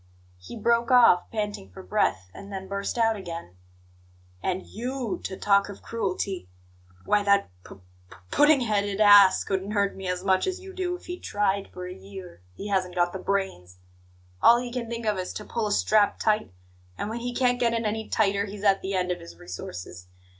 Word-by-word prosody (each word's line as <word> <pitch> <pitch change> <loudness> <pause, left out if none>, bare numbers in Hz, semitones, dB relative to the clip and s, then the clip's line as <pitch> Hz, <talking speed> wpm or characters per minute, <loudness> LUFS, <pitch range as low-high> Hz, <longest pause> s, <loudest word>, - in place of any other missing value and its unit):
He 90 - -10
broke 235 +2 +2
off, 240 -8 +6
panting 210 - -4
for 95 - -11
breath, 90 0 0
and 200 0 -11
then 190 -1 -6
burst 200 +4 -3
out 225 -1 +3
again: 170 - -8 0.9
"And 185 0 -2
YOU 245 -1 -4
to 190 - -5
talk 200 0 +3
of 200 - -10
cruelty! 195 - -3 0.6
Why, 210 - +3
that 200 - +2
p - - -12 0.3
p - - -14 0.2
pudding 295 -2 +5
headed 205 -3 0
ass 205 -2 +7
couldn't 195 +1 -2
hurt 200 -1 +1
me 190 -1 -6
as 180 0 -2
much 190 - +2
as 375 0 -2
you 380 0 -11
do 360 -1 -2
if 360 - -13
he 355 0 -6
tried 200 -1 -1
for 180 0 -7
a 180 - -6
year; 190 - -11
he 205 - -6
hasn't 185 -2 0
got 175 0 +1
the 190 - -5
brains. 185 - -3 0.6
All 235 +1 +7
he 245 0 -5
can 240 -3 -4
think 235 -1 -5
of 210 -3 0
is 180 - -4
to 210 - -7
pull 225 -2 -2
a - - -3
strap 205 0 +3
tight, 215 - 0 0.5
and - - -3
when 225 +2 -4
he 245 +1 -3
can't 245 -1 +2
get 235 -1 +2
it 230 -1 -1
any 220 +1 -2
tighter 200 -2 +1
he's 205 0 -8
at 195 -2 +4
the 195 +1 -3
end 180 -1 0
of 180 - -3
his 85 0 -11
resources. 90 0 -8
200 Hz, 205 wpm, -26 LUFS, 185-225 Hz, 0.9 s, ass